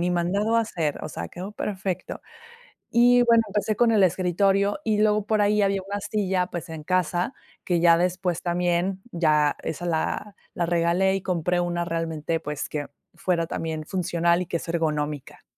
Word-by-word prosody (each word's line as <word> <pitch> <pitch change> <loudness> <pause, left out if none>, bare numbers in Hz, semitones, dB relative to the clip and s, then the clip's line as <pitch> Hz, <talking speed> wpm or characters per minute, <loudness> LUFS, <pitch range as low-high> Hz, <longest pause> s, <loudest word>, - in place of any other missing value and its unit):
"Ni 175 +1 +1
mandado 200 +6 +1
a - - +5
hacer", 165 -10 -2
o - - -4
sea, 85 - -6
quedó 190 +4 -7
perfecto. 190 -3 -4 0.7
Y, 245 +1 +5
bueno, 230 -1 +5
empecé 210 +1 -1
con 240 -1 +4
el 210 - +4
escritorio 195 - +2
y 215 -2 +1
luego 210 -1 +2
por 215 -1 +2
ahí 210 +1 +3
había 195 -1 +1
una 200 +1 -3
silla, 190 -3 0
pues, 175 -2 -6
en 160 -1 -7
casa, 185 - 0 0.3
que 175 -2 +1
ya 170 -1 +6
después 180 -1 0
también 175 +2 0
ya 150 -3 +3
esa 170 +3 -4
la 175 +4 -2 0.2
la 175 - -1
regalé 175 +3 +2
y 195 - -4
compré 180 -1 0
una 175 0 -1
realmente, 165 -1 -2
pues, 150 0 -4
que 145 -1 -3 0.3
fuera 170 -2 0
también 160 -1 -4
funcional 170 -1 +1
y - - -6
que 170 - -2
es - - -10
ergonómica. 150 -4 -2
180 Hz, 175 wpm, -25 LUFS, 165-200 Hz, 0.7 s, ya